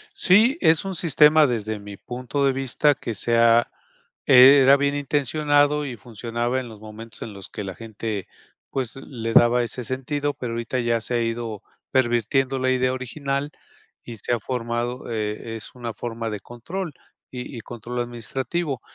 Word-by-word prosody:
Sí, 225 - +4
es 160 +3 +4
un 190 - -3
sistema, 155 -2 +5
desde 110 -3 -2
mi 100 -1 -10
punto 125 +4 -3
de 135 - +3
vista, 135 +2 +2
que 115 -4 -6
se 115 +4 0
ha 115 0 +4 0.6
era 135 +2 +8
bien 140 0 0
intencionado 145 +1 +1
y 125 -4 -6
funcionaba 120 +1 -3
en 125 - -9
los 110 -2 -12
momentos 110 +1 -11
en 110 - -7
los 100 -2 -10
que 105 - -6
la 95 -1 -5
gente, 110 -3 -5 0.4
pues, 130 -3 -3
le 115 -4 -5
daba 120 +1 +5
ese 125 +1 -4
sentido, 140 +4 -2
pero 125 -5 -5
ahorita 120 +2 -2
ya 120 -1 +1
se 120 - -2
ha 120 - +1
ido 115 -2 -4 0.3
pervirtiendo 130 +1 +1
la 130 - +1
idea 130 0 +1
original 140 +2 -3 0.5
y 115 -2 -9
se 120 - -2
ha 120 - 0
formado, 120 +1 -3
e 110 0 -3
es 110 - -8
una 120 -2 -5
forma 115 0 -4
de 105 - -4
control, 160 - -6 0.4
y 125 0 -7
y - - -6
control 120 +2 -6
administrativo, 130 +5 -3
125 Hz, 170 wpm, -23 LUFS, 115-140 Hz, 0.6 s, era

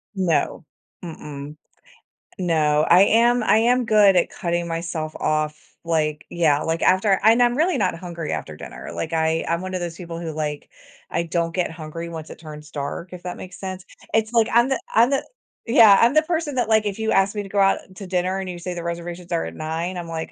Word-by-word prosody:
No. 170 -4 0 0.4
Mm-mm. 150 -3 -8 0.8
No, 155 -4 +2
I 175 +2 +7
am 235 +3 +4
I 215 - +4
am 245 +2 +3
good 210 -3 +5
at 175 - +3
cutting 170 0 -2
myself 165 -2 -4
off. 155 0 -1 0.3
Like 155 -2 -1
yeah, 155 -4 +2
like, 165 +1 -2
after 190 +1 +3
and 225 +3 +5
I'm 240 0 +3
really 330 0 +2
not - - 0
hungry 170 -3 -6
after 80 - -5
dinner. - - -9
Like, 165 0 -4
I 160 0 +1
I'm 170 +1 0
one 185 0 -6
of 185 - -1
those 170 -1 -5
people 170 -2 -7
who, 165 -2 -4
like, 150 -1 -4 0.4
I - - -1
don't 165 0 -2
get 180 -3 0
hungry 165 +1 -7
once 160 -2 -7
it - - -10
turns 150 -1 -10
dark, 150 +5 -5
if 180 - -9
that 180 -1 -5
makes 185 - -10
sense. 185 -1 -6 0.3
It's 220 0 +1
like, 230 -2 +4
I'm 240 +2 +5
the 265 - 0
I'm 235 +3 +5
the 275 - 0 0.4
Yeah, 225 -4 +7
I'm 235 +4 +5
the 310 - +5
person 320 -3 -2
that, 245 -3 +1
like, 220 -1 +3
if 205 0 -3
you 220 0 0
ask 195 0 +3
me 205 - -2
to 195 - -10
go 200 0 -1
out 195 0 +4 0.2
to 195 0 -8
dinner 185 +1 0
and 190 -1 -5
you 175 -1 -6
say 180 +1 -5
the 170 -1 -6
reservations 170 +1 -6
are 80 - 0
at 80 0 -7
9:00, 165 - -3
I'm 175 -1 -6
like, 160 -1 -5
175 Hz, 220 wpm, -22 LUFS, 160-205 Hz, 0.8 s, I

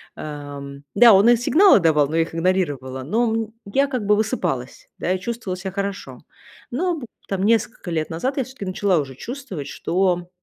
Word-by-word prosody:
ам, 145 -2 -8
да, 230 0 +8
он 200 +4 +6
и 240 - +7
сигналы 315 - +5
давал, 150 -4 +3
но 160 - -4
я 165 - +4
их 165 - -3
игнорировала. 145 -8 -1
Но 225 - +1
мнь 225 0 -2
я, 275 +8 +1
как 250 -6 -3
бы, 210 +1 +4
высыпалась, 180 - -2
да, 180 - -1
и 185 - -2
чувствовала 225 -3 -4
ся 190 +1 -5
хорошо. 200 0 -5 0.5
Но 335 +5 -1
б 240 - -7 0.2
там, 195 -1 -2
несколько 225 -2 +1
лет 160 0 -1
назад 255 - -2
я, 265 - +1
всё-таки, 255 -5 -9
начала 185 0 +1
уже 135 -3 -5
чувствовать, 235 - -7
что, 180 -1 -1
190 Hz, 190 wpm, -22 LUFS, 160-230 Hz, 0.5 s, да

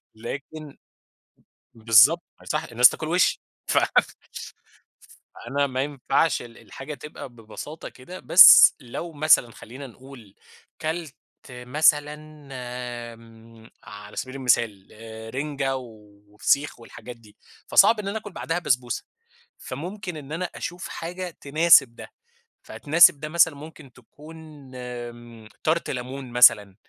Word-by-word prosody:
لكن 145 +6 -9 1.0
بالضبط 115 +9 +4 0.2
ما - - -21
يصح 150 - -3
الناس 125 +1 +5
تاكل 155 - -7
وشي 175 +2 +1 0.3
ف - - +3 1.6
فأنا 140 +1 -2
ما 130 -1 -3
ينفعش 140 +1 -1
ال 120 -1 -13
الحاجة 140 +3 -10
تبقى 145 -1 -10
ببساطة 120 +7 -10
كده، 175 +9 -12
بس 180 - +8
لو 160 +7 -8
مثلًا 150 -5 +3
خلّينا 130 +6 -11
نقول 125 -4 -16 0.5
اكلت 160 -2 -5 0.4
مثلًا 145 +4 +1 1.0
آمم، 115 0 -18
على 105 0 -12
سبيل 130 +1 -6
المثال 115 -7 0 0.5
رنجة 140 -1 -3
وفسيخ 105 +3 -4
والحاجات 120 +1 -12
دي، 110 -3 -21 0.3
فصعب 225 - +5
إن 205 - -6
أنا 200 +2 -3
آكل 210 -1 -9
بعدها 170 -1 -4
بسبوسة، 125 -7 -2 0.5
فممكن 180 +5 -8
إن 145 -1 -11
أنا 170 +3 -3
أشوف 175 +1 -7
حاجة 180 +2 -7
تناسب 145 -4 +4
ده، - - -13 0.5
فتناسب 155 -1 +4
ده 150 +1 -6
مثلًا 160 -2 +3
ممكن 145 -2 -13
تكون 150 +7 -16 0.4
آمم 120 -2 -10 0.2
Tart 165 +2 -1
ليمون 130 0 -7
مثلًا 105 -5 +4
135 Hz, 120 wpm, -23 LUFS, 120-155 Hz, 1.6 s, بس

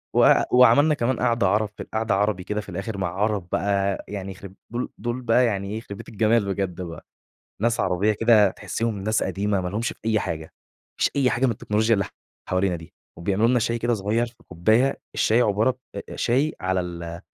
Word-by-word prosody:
و - - +7 0.2
وعملنا 125 +5 +6
كمان 130 -2 0
قعدة 115 -4 +2
عرب 105 +2 +1
في - - -5
ال - - -18
قعدة 110 -2 0
عربي 100 -2 0
كده 105 +2 -2
في 100 - -13
الآخر 100 +4 -4
مع 95 -2 -1
عرب 100 -1 -1
بقى 100 -1 0
يعني 100 -1 -5
يخرب 95 0 -11 0.2
دول 120 +1 -3
دول 120 +2 -3
بقى 120 +1 +3
يعني 100 -3 -1
إيه، 110 - -3
يخربيت 100 -3 -9
الجمال 110 0 +2
بجد 95 -2 -3
بقى، 85 -2 -8 0.6
ناس 115 0 +2
عربية 95 +4 +2
كده 105 -2 +4
تحسّيهم 115 +2 -3
ناس 110 +3 0
قديمة 100 0 0
ما 90 - -3
لهُمش 110 +5 -2
في - - -5
أي 110 -1 +2
حاجة، 80 -3 -3
ما - - -14 0.5
لهُمش - - +5
في - - -20
أي 130 -3 +3
حاجة 130 +2 +1
من 120 - +2
التكنولوجيا 110 +2 +1
اللي 100 -2 0 0.4
حوالينا 90 -1 +1
دي، 80 -1 -13 0.2
وبيعملوا 100 +6 +1
لنا 125 0 +3
شاي 115 +1 0
كده 120 +1 +1
صغير 110 +3 0
في 120 - -14
كوباية، 110 +10 +2
الشاي 115 +3 +3
عبارة 110 +5 +1 0.2
أ - - -4
أ - - -8
شاي 135 +6 +1
على 95 0 0
ال 85 -1 -6
105 Hz, 210 wpm, -24 LUFS, 95-115 Hz, 0.6 s, و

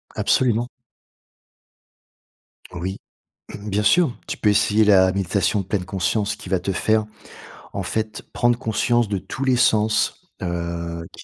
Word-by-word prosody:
Absolument. 120 -1 +2 2.0
Oui, 90 +2 -4 0.6
bien 105 0 -2
sûr, 165 -1 +3
tu - - -4
peux 105 - +2
essayer 105 +1 +3
la 95 -2 +5
méditation 100 +2 0
pleine 95 0 -2
conscience, 100 +3 -1
qui - - -11
va 95 -2 +1
te 95 +2 -2
faire, 110 +3 +1 0.7
en 100 - -3
fait, 110 +3 -3
prendre 120 0 +2
conscience 120 -1 +1
de 100 - 0
tous 135 +8 -6
les 130 -2 +3
sens, 110 -3 +1
heu, 85 -1 -4
qui - - -12
105 Hz, 135 wpm, -22 LUFS, 95-110 Hz, 2.0 s, la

